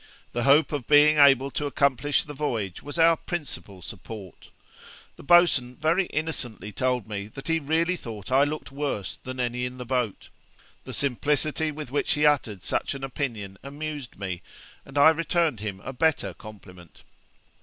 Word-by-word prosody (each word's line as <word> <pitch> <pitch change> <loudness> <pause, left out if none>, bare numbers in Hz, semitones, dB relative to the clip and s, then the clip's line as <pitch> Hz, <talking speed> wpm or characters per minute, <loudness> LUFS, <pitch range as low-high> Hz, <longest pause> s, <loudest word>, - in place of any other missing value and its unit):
The 120 +1 -2
hope 140 +2 +5
of 145 -5 -3
being 150 +1 +6
able 135 -1 +6
to 145 - -2
accomplish 140 0 +1
the 150 - -8
voyage 115 - -3
was 145 +3 -7
our 165 0 +6
principal 145 - -6
support. 95 -1 -9 0.7
The - - -13
boatswain 145 -7 +4
very 165 +6 +1
innocently 135 -9 -4
told 125 0 -1
me 100 -1 -5
that 135 +5 -10
he 165 0 +2
really 165 +4 +1
thought 110 - -8
I 135 +2 +5
looked 145 -3 -3
worse 135 -9 -3
than 130 0 -8
any 125 0 -1
in 125 0 -4
the 125 - -6
boat. 125 -4 -2 0.6
The - - -7
simplicity 150 +3 0
with 150 -4 -7
which 145 - +1
he 150 0 +2
uttered 115 -10 +2
such - - -1
an 135 - -7
opinion 115 -8 -4
amused 145 -1 -6
me, 95 -3 -4 0.5
and 135 +1 -8
I 145 +3 +8
returned 165 - 0
him 100 -2 -5
a 135 - -6
better 130 - +1
compliment.' 90 -6 -14
135 Hz, 165 wpm, -26 LUFS, 110-150 Hz, 0.7 s, I